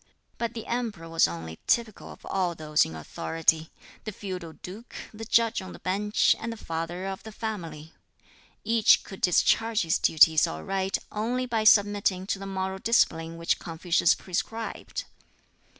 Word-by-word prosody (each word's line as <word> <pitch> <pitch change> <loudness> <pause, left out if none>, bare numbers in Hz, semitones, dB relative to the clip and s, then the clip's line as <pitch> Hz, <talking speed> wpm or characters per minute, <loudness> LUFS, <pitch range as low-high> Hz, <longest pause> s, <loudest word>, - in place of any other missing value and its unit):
But 235 0 -2
the 225 - -6
Emperor 225 -9 -3
was 165 0 +3
only 80 -1 -7
typical 230 -4 0
of - - -14
all 180 -3 -1
those 155 -1 +2
in 80 - -8
authority 160 - 0 0.3
the 215 - -5
feudal 185 -5 -7
duke, 205 +9 -11 0.2
the 225 +1 -7
judge 230 -1 +2
on 185 - -9
the - - -10
bench, 205 +3 +2
and 230 - -4
the 230 - -7
father 165 +1 -4
of 195 0 -5
the 220 - -10
family. 170 -8 -6 0.7
Each 225 -1 +4
could 195 - -11
discharge 225 +5 +3
his 165 -1 +1
duties 160 0 +5
aright 190 - -2
only 240 +4 -1
by 225 -3 -1
submitting 205 -3 +4
to 195 - -6
the 195 - -6
moral 190 0 -3
discipline 165 -7 +1
which 165 0 0
Confucius 170 0 +1
prescribed. 225 +5 -4
190 Hz, 155 wpm, -27 LUFS, 165-220 Hz, 0.7 s, duties